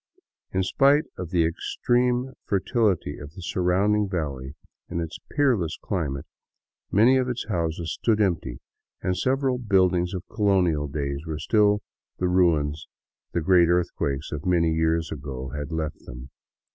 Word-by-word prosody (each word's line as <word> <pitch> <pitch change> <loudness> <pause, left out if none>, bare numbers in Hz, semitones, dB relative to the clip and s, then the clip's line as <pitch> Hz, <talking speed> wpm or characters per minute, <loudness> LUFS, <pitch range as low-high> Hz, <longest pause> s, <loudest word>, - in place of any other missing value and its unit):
In 95 0 +1
spite 140 +9 +4
of 90 -3 -6
the 85 -2 +2
extreme 125 +9 0
fertility 100 -5 0
of 75 +1 -10
the 95 - -10
surrounding 95 +4 +1
valley 70 -6 -4 0.3
and 85 - -2
its 85 0 -5
peerless 120 - +1
climate, 75 -9 -3 0.7
many 120 +6 +5
of 130 -1 0
its 125 -1 -3
houses 85 -3 -2
stood 110 -2 +2
empty, 85 - 0 0.4
and 95 - 0
several 130 +2 +1
buildings 95 -5 +2
of 90 - -4
colonial 90 -8 +1
days 70 +1 -4
were 80 -1 -3
still 105 +3 +2 0.3
the 90 - 0
ruins 80 -5 +2 0.5
the 85 - 0
great 85 +1 +5
earthquake 85 -6 0
of 75 -1 -4
many 85 -3 +2
years 80 0 +1
ago 70 -3 -6
had 75 +3 -5
left 80 -2 -3
them. 60 +2 -9
90 Hz, 145 wpm, -25 LUFS, 75-105 Hz, 0.7 s, many